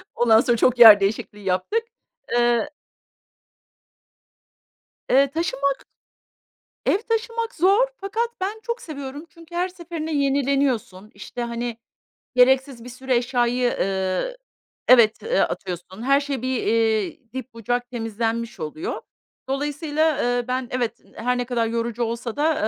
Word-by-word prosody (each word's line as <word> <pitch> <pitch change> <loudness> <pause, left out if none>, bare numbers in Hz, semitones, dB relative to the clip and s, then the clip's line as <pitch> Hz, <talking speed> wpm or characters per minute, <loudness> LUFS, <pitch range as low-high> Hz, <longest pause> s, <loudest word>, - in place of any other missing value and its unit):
Ondan 225 -2 +5
sonra 240 -1 +1
çok 250 +1 +2
yer 220 -4 +11
değişikliği 205 +1 -2
yaptık, 190 - 0 0.5
eee 240 +3 +2 2.4
Eee, 275 +1 +4
taşınmak 280 -4 -1 1.0
Ev - - +3
taşımak 455 +1 -1
zor, 395 +9 +4
fakat 415 +4 -2
ben 410 +4 -2
çok 470 0 -3
seviyorum. 285 -1 -7
Çünkü 335 0 -14
her 360 +2 0
seferinde 340 -3 -6
yenileniyorsun, 275 -8 0
işte, 245 - -7
hani, 235 0 -4 0.6
gereksiz 260 -1 +3
bir 245 - -9
sürü 260 +2 -8
eşyayı, 245 0 +1 0.2
eee 190 - -1 0.5
Evet, 235 - +6
eee, 485 +2 +1
atıyorsun, 180 +3 -3
her 275 +3 +3
şey 280 -3 -3
bir, 255 -1 -1
iii, 230 +4 0
dip 260 -1 -7
bucak 245 +2 -2
temizlenmiş 230 0 -3
oluyor. 315 - -4 0.5
Dolayısıyla, 295 +2 0
eee, 245 -2 0
ben 255 0 -2
evet, 240 -2 -2 0.2
her 250 +2 -1
ne 245 - -1
kadar 235 -2 0
yorucu 230 +1 -2
olsa 230 0 -4
da, 310 +2 +2
255 Hz, 125 wpm, -23 LUFS, 230-300 Hz, 2.4 s, yer